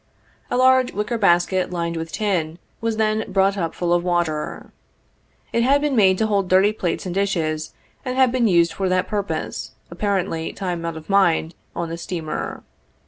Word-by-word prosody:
A -, -, 0 dB
large 260 Hz, 0 st, +4 dB
wicker 210 Hz, +3 st, -2 dB
basket, 180 Hz, -1 st, +3 dB
lined 170 Hz, -1 st, -2 dB
with 165 Hz, 0 st, -5 dB
tin, 175 Hz, -6 st, -1 dB, 0.2 s
was 225 Hz, -1 st, -1 dB
then 215 Hz, 0 st, +1 dB
brought 195 Hz, +1 st, +3 dB
up 165 Hz, -4 st, -3 dB
full 175 Hz, -1 st, 0 dB
of 175 Hz, 0 st, +2 dB
water. 175 Hz, -4 st, -2 dB, 0.8 s
It 235 Hz, -, +2 dB
had 275 Hz, +4 st, +4 dB
been 290 Hz, -2 st, 0 dB
made 190 Hz, -4 st, +5 dB
to 220 Hz, -, +1 dB
hold 200 Hz, -3 st, +1 dB
dirty 190 Hz, +3 st, +5 dB
plates 180 Hz, -4 st, -2 dB
and 180 Hz, -, -3 dB
dishes, 165 Hz, -6 st, -1 dB, 0.3 s
and 255 Hz, -1 st, -3 dB
had 260 Hz, -2 st, +5 dB
been 245 Hz, -2 st, +2 dB
used 170 Hz, -3 st, +3 dB
for 190 Hz, -1 st, -1 dB
that 185 Hz, 0 st, +1 dB
purpose, 205 Hz, -2 st, -3 dB, 0.2 s
apparently, 185 Hz, -5 st, -1 dB
time 180 Hz, -3 st, -3 dB
out 165 Hz, -1 st, -4 dB
of 155 Hz, -, -11 dB
mind, 175 Hz, -4 st, +2 dB, 0.2 s
on 170 Hz, -1 st, -3 dB
the 165 Hz, -, -4 dB
steamer. 165 Hz, -3 st, -4 dB
190 Hz, 180 wpm, -22 LUFS, 170-215 Hz, 0.8 s, made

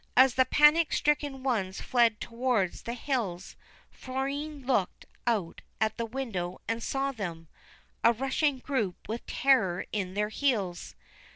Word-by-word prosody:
As 260 Hz, 0 st, +7 dB
the 260 Hz, 0 st, +4 dB
panic 300 Hz, +3 st, +5 dB
stricken 290 Hz, -3 st, 0 dB
ones 205 Hz, -8 st, -1 dB
fled 235 Hz, -3 st, +2 dB
towards 230 Hz, -6 st, -1 dB
the 235 Hz, -, -4 dB
hills, 225 Hz, -9 st, -3 dB, 0.4 s
Florine 275 Hz, +2 st, -4 dB
looked 245 Hz, -8 st, 0 dB, 0.2 s
out 210 Hz, -8 st, 0 dB, 0.2 s
at 220 Hz, 0 st, 0 dB
the 230 Hz, -, -2 dB
window 215 Hz, -8 st, -4 dB
and 230 Hz, 0 st, -1 dB
saw 275 Hz, +3 st, -1 dB
them, 170 Hz, -9 st, -6 dB, 0.6 s
a 230 Hz, -, +7 dB
rushing 270 Hz, +4 st, 0 dB
group 250 Hz, -9 st, -3 dB
with 225 Hz, +3 st, -4 dB
terror 220 Hz, -11 st, +2 dB
in 190 Hz, -3 st, -3 dB
their 210 Hz, +1 st, 0 dB
heels. 215 Hz, -9 st, -1 dB
235 Hz, 135 wpm, -29 LUFS, 200-270 Hz, 0.6 s, As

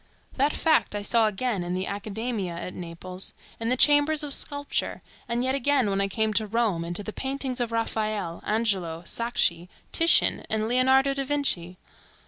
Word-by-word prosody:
That 280 Hz, +2 st, +2 dB
fact 315 Hz, -10 st, +1 dB
I 205 Hz, -, -3 dB
saw 225 Hz, +1 st, +3 dB
again 215 Hz, -2 st, -1 dB
in 175 Hz, +1 st, -3 dB
the 185 Hz, +1 st, -2 dB
Academmia 205 Hz, -2 st, -3 dB
at 180 Hz, +2 st, -6 dB
Naples, 180 Hz, +2 st, -4 dB, 0.3 s
in 230 Hz, 0 st, -2 dB
the 255 Hz, -, +2 dB
chambers 295 Hz, +2 st, +5 dB
of 290 Hz, -2 st, +4 dB
sculpture, 285 Hz, 0 st, -1 dB, 0.3 s
and 235 Hz, +1 st, 0 dB
yet 260 Hz, +1 st, +1 dB
again 275 Hz, -5 st, +2 dB
when 195 Hz, 0 st, +1 dB
I 195 Hz, -, +2 dB
came 220 Hz, +2 st, 0 dB
to 215 Hz, +1 st, +1 dB
Rome 210 Hz, -6 st, 0 dB
and 170 Hz, +1 st, -5 dB
to 205 Hz, -, -1 dB
the 215 Hz, -, -6 dB
paintings 265 Hz, -1 st, -3 dB
of 235 Hz, -1 st, -2 dB
Raphael, 215 Hz, -6 st, -2 dB
Angelo, 190 Hz, -7 st, 0 dB
Sacchi, 180 Hz, -6 st, 0 dB, 0.2 s
Titian, 330 Hz, +1 st, +3 dB
and 220 Hz, 0 st, 0 dB
Leonardo 265 Hz, +3 st, +3 dB
da 275 Hz, 0 st, -2 dB
Vinci. 260 Hz, -11 st, -1 dB
220 Hz, 175 wpm, -26 LUFS, 190-265 Hz, 0.3 s, chambers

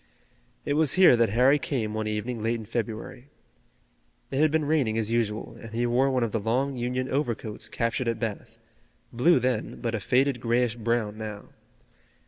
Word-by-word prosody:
It 145 Hz, -, 0 dB
was 150 Hz, -2 st, +2 dB
here 185 Hz, -8 st, +7 dB
that 115 Hz, -1 st, +2 dB
Harry 130 Hz, +7 st, +4 dB
came 115 Hz, -7 st, -2 dB
one 110 Hz, 0 st, -2 dB
evening 110 Hz, +2 st, -3 dB
late 115 Hz, +2 st, 0 dB
in 110 Hz, -2 st, -6 dB
February. 115 Hz, +3 st, -5 dB, 1.0 s
It 135 Hz, -, -1 dB
had 155 Hz, +1 st, +5 dB
been 155 Hz, 0 st, +1 dB
raining 140 Hz, -8 st, +1 dB
as 110 Hz, 0 st, -1 dB
usual, 115 Hz, -1 st, -1 dB
and 115 Hz, -, -9 dB
he 120 Hz, +1 st, +1 dB
wore 125 Hz, +3 st, +2 dB
one 130 Hz, -2 st, +1 dB
of 115 Hz, -, -1 dB
the 115 Hz, -, -1 dB
long 130 Hz, +6 st, 0 dB
Union 125 Hz, +1 st, -2 dB
overcoats 120 Hz, -6 st, -3 dB
captured 115 Hz, +2 st, -1 dB
at 115 Hz, -1 st, -1 dB
Bath, 115 Hz, 0 st, -5 dB, 0.6 s
blue 130 Hz, +9 st, +4 dB
then 125 Hz, -3 st, -2 dB
but 115 Hz, -2 st, -2 dB
a 115 Hz, -, -1 dB
faded 130 Hz, +4 st, +1 dB
grayish 120 Hz, 0 st, +1 dB
brown 115 Hz, -2 st, -1 dB
now. 105 Hz, -2 st, -7 dB
120 Hz, 180 wpm, -26 LUFS, 110-130 Hz, 1.0 s, here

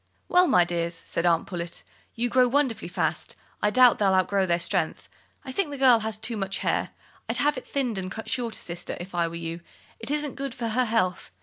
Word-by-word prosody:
"Well, 360 Hz, 0 st, +5 dB
my 180 Hz, -, +5 dB
dears," 170 Hz, -1 st, -3 dB
said 170 Hz, +1 st, 0 dB
Aunt 165 Hz, -1 st, +2 dB
Pullet, 170 Hz, -2 st, -6 dB, 0.3 s
"you 240 Hz, +1 st, 0 dB
grow 250 Hz, +1 st, +4 dB
wonderfully 265 Hz, -2 st, 0 dB
fast, -, -, -2 dB, 0.3 s
I 210 Hz, -, +3 dB
doubt 250 Hz, +2 st, +6 dB
they'll 195 Hz, -2 st, +3 dB
outgrow 190 Hz, +1 st, +2 dB
their 170 Hz, -1 st, +2 dB
strength. 170 Hz, -, -1 dB, 0.4 s
I 260 Hz, -, -5 dB
think 365 Hz, +3 st, 0 dB
the 285 Hz, -, -6 dB
girl 255 Hz, -3 st, +6 dB
has 220 Hz, -1 st, -3 dB
too 225 Hz, +1 st, -2 dB
much 195 Hz, -1 st, -2 dB
hair. -, -, +1 dB, 0.4 s
I'd -, -, 0 dB
have 295 Hz, +1 st, +2 dB
it 255 Hz, -, -8 dB
thinned 250 Hz, -7 st, -1 dB
and 185 Hz, -1 st, -4 dB
cut 220 Hz, +1 st, -7 dB
shorter, 235 Hz, -1 st, -2 dB
sister, 175 Hz, +1 st, -5 dB
if 175 Hz, +2 st, -8 dB
I 170 Hz, -1 st, +1 dB
were 165 Hz, -, -7 dB
you; 165 Hz, 0 st, -5 dB, 0.4 s
it 230 Hz, -, -6 dB
isn't 295 Hz, -1 st, -2 dB
good 275 Hz, -2 st, -4 dB
for 230 Hz, -1 st, -3 dB
her 250 Hz, +3 st, +1 dB
health. 215 Hz, -6 st, 0 dB
220 Hz, 220 wpm, -26 LUFS, 175-255 Hz, 0.4 s, doubt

